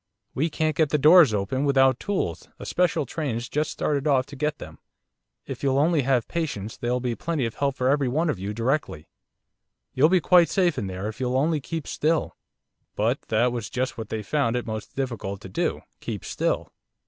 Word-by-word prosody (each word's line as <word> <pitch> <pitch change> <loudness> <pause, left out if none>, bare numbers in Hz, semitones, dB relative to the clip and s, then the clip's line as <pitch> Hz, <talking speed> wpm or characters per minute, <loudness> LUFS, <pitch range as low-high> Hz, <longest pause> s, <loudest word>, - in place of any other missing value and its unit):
We 155 +5 0
can't 155 -1 -1
get 155 -2 +2
the 150 - +2
doors 155 -1 +7
open 105 +7 -1
without 135 -3 +4
tools, 195 - -3
a - - -9
special 175 -5 +1
train's 125 -4 -3
just 150 +3 -1
started 145 -1 -1
off 135 -3 +3
to 140 - -11
get 150 +2 -1
them. - - -11 0.7
If - - -7
you'll 135 -1 +1
only 155 +1 +3
have 130 -3 +1
patience 135 - -3
there'll 125 +1 -1
be 125 -1 -2
plenty 155 +1 -2
of 115 - -3
help 140 -1 -1
for 130 -2 0
everyone 140 +3 +1
of 150 - -1
you 100 +2 -3
directly. 115 - -2 0.8
You'll 150 +5 +4
be 185 0 +4
quite 175 0 +5
safe 180 -5 +1
in 100 - -3
there, 95 +2 -4
if 110 +3 -7
you'll 130 0 0
only 155 +2 +1
keep 160 +2 -5
still.' 160 +1 0 0.6
But 115 +6 0
that 115 +3 +2
was 120 -3 -4
just 130 +1 -2
what 110 -3 -7
they 110 -1 -3
found 125 -1 0
it 125 - -2
most 110 -1 -6
difficult 115 -7 -3
to 95 - -9
do - - -1 0.2
keep - - -5
still! - - -1
135 Hz, 200 wpm, -25 LUFS, 115-155 Hz, 0.8 s, doors